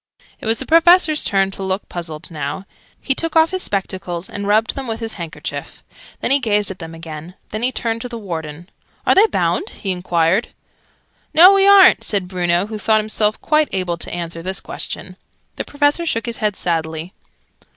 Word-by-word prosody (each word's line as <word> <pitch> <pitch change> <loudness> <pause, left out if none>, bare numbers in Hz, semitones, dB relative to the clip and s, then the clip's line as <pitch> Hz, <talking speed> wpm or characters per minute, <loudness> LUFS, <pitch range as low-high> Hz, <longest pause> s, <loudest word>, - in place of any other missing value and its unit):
It - - -7
was 225 +1 +2
the 265 - -6
Professor's 330 -1 +5
turn 195 -1 +1
to 195 - -9
look 190 +1 -3
puzzled 165 -1 -5
now. 150 +4 -5 0.4
He 270 - +2
took 330 +4 -3
off 320 +1 +5
his 375 0 -2
spectacles, 190 - -3
and 200 0 -5
rubbed 215 +2 +2
them 270 -2 -6
with 225 -1 -3
his 225 -1 -3
handkerchief. 170 -3 -7 0.4
Then - - 0
he 280 - +5
gazed 210 -5 +1
at 190 - -9
them 165 -1 -8
again. 165 +1 -9
Then 215 - -4
he 250 +2 +2
turned 230 -2 -2
to 245 - -5
the 235 - -6
Warden. 165 -5 -6 0.4
"Are - - +5
they 405 +4 +6
bound?" 405 -1 -1
he 195 - -4
enquired. 180 +3 +1 0.9
"No, 360 +5 +9
we 390 0 +4
aren't," 395 -2 +7
said 195 -4 0
Bruno, 175 0 0
who 215 0 -6
thought 215 +1 +3
himself 215 0 0
quite 305 -1 +2
able 180 -3 -2
to - - -5
answer 170 -1 -5
this 190 +2 -2
question. 185 -1 -6 0.4
The - - -3
Professor 290 +3 0
shook 230 -6 -1
his 235 -1 -5
head 210 -2 0
sadly. 165 0 -3
205 Hz, 195 wpm, -19 LUFS, 175-255 Hz, 0.9 s, No